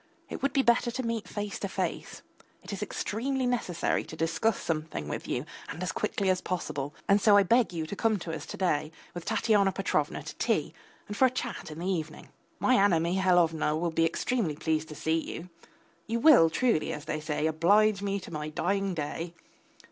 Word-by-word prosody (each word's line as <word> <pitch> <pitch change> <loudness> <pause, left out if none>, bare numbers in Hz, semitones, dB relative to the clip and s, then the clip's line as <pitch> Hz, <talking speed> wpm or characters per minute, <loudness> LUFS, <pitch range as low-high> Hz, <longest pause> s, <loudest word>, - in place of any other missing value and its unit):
it - - -5
would 275 - +1
be 270 - +2
better 240 0 +3
to 255 +2 -3
meet 230 -2 -2
face 205 -1 -4
to - - -2
face, - - -4 0.4
it - - -7
is - - -5
extremely 260 +5 -2
necessary 235 -9 0
to - - -10
discuss 165 +7 0
something 155 - -3
with - - -5
you - - -2 0.2
and 170 - -5
as 180 - -1
quickly 200 +1 -1
as 185 -1 +2
possible, 145 -5 -3
and 200 0 +4
so 205 -1 +6
I 200 - +6
beg 230 +3 +3
you 165 -2 -3
to 180 - -6
come 220 0 +1
to 170 -3 -6
us 150 - -8
to - - -7
day 155 -5 0 0.2
with 175 -1 -7
Tatyana 215 -3 +3
Petrovna - - -1
to - - -8
tea - - 0 0.3
and 205 - -5
for 260 - +5
a - - 0
chat 245 -6 -5
in 155 - -8
the 170 - -5
evening. 160 -5 -3 0.3
My 255 - +3
Anna 180 -5 +4
Mihalovna 170 -3 +2
will 170 0 -1
be 165 0 +2
extremely 170 +1 0
pleased 160 +1 -1
to 150 - -8
see 160 +2 0
you. 170 +2 -7 0.6
You 230 +1 -1
will 240 - +7
truly, 230 -2 +1
as 150 - -6
they 155 - -2
say, 155 0 -2
oblige 195 +6 +3
me 200 0 -1
to 180 - -10
my 150 0 -3
dying 195 +4 -1
day. 165 +2 -4
180 Hz, 205 wpm, -29 LUFS, 160-215 Hz, 0.6 s, will